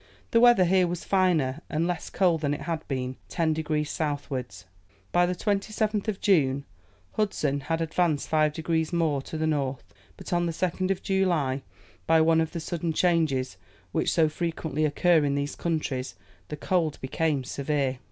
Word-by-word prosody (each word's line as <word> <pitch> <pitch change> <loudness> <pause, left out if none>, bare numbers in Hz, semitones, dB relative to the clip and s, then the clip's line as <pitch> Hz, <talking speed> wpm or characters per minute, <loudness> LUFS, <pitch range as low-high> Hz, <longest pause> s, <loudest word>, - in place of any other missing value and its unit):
The 230 - +5
weather 240 -6 +6
here 185 0 +3
was 175 0 -4
finer 165 -7 +1
and 160 +2 0
less 175 0 -3
cold 175 -5 +2
than 145 -1 0
it - - -8
had 160 0 -4
been 130 -1 -3
ten 160 -2 +1
degrees 155 -1 -1
southwards. 130 - -4 0.5
By 175 0 +4
the 180 - -1
27th 210 +2 -1
of 210 -2 -2
June, 140 -8 +2 0.5
Hudson 155 -9 0
had 165 +4 -2
advanced 165 -2 0
5 155 -1 +2
degrees 160 0 -1
more 160 -5 +1
to 160 - -7
the 155 - 0
north, 140 -4 -2 0.2
but - - -6
on 175 0 +2
the 165 - -2
2nd 185 +2 -1
of 195 - -1
July, 175 -9 +1 0.5
by 165 0 +5
one 160 0 +4
of 160 - -2
the 170 - -4
sudden 165 0 -3
changes 155 - +1 0.3
which - - 0
so 160 -2 +4
frequently 155 -1 -2
occur 160 +2 +3
in 140 -1 +1
those 145 0 -2
countries, 135 - -2 0.3
the 150 - -6
cold 165 -1 0
became 140 +1 -1
severe. 135 -1 -1
160 Hz, 170 wpm, -27 LUFS, 145-175 Hz, 0.5 s, weather